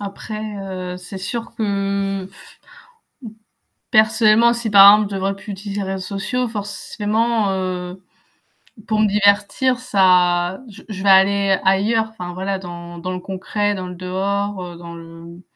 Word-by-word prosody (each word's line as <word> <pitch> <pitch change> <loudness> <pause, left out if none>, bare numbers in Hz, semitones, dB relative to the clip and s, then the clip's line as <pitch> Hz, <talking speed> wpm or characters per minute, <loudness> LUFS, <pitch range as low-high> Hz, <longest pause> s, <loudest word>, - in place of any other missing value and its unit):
Après, 205 +2 -6 0.5
heu, - - -7
c'est 180 +2 -9
sûr 230 +4 -5
que, 200 -3 -2 1.6
personnellement 220 +1 +4
si 235 -1 -3
par 200 0 +9
exemple 210 -1 -1
je - - -3
ne - - -2
devrais 195 +1 -1
plus 205 +1 -9
utiliser 200 +1 -5
les 195 - -4
réseaux 190 - -4 0.2
sociaux 250 +5 -1
forcément, 215 +1 -1
heu, 185 -1 -4 0.9
pour 215 -1 0
me 215 - +4
divertir 205 +5 +2
ça 180 -4 +2
je 215 +1 -13
je 195 -2 -6
vais 200 - +3
aller 195 0 +4
ailleurs. 210 +4 +2
Enfin 180 -5 -8
voilà 190 +2 -3
dans 175 -1 -9
dans 185 +2 -4
le 180 - -4
concret, 205 +2 -2
dans 185 -1 -5
le 180 - -8
dehors, 195 +2 -2
heu, 175 -1 -8
dans 170 0 -10
le 165 +1 -12
195 Hz, 155 wpm, -20 LUFS, 185-215 Hz, 1.6 s, par